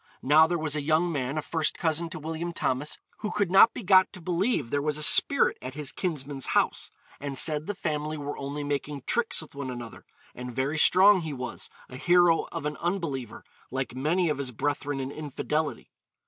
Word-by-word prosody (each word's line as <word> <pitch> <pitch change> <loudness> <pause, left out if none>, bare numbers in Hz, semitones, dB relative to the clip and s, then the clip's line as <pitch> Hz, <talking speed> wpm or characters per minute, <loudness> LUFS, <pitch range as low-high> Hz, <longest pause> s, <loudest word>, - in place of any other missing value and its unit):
Now 155 +4 +6
there 175 +1 -1
was 155 -2 -2
a 150 - -1
young 160 +4 +1
man, 140 -1 -2
a 155 - -2
first 160 -2 -1
cousin 165 0 -1
to - - -7
William 165 +2 -4
Thomas, 140 -1 -2 0.2
who 210 - -3
could 200 -4 -1
not 195 +4 +7
be - - -8
got 185 0 +5
to 185 - -9
believe 175 - -1
there 145 - 0
was 150 0 -1
a 155 - 0
spirit 280 - +4
at 130 +1 -7
his 145 -3 0
kinsman's 145 -6 -3
house, - - 0 0.3
and 140 -1 -4
said 150 +2 +2
the 205 - -3
family 155 -3 -3
were 145 0 -5
only 140 +1 -5
making 145 -1 -3
tricks 230 -7 0
with 155 - -16
one 140 -2 -5
another, 120 -2 -8 0.3
'and 125 -1 -8
very 140 +4 -1
strong 190 +4 +6
he 160 -3 -5
was, 130 -1 -6 0.2
a 125 - -10
hero 175 +2 +3
of 165 -3 -5
an 150 -1 -3
unbeliever, 165 - -3 0.3
like 130 -2 -3
many 160 +8 0
of 150 -3 -1
his 135 -2 -2
brethren 145 +3 -2
in 135 0 -4
infidelity.' 150 +1 -3
150 Hz, 205 wpm, -27 LUFS, 140-170 Hz, 0.3 s, not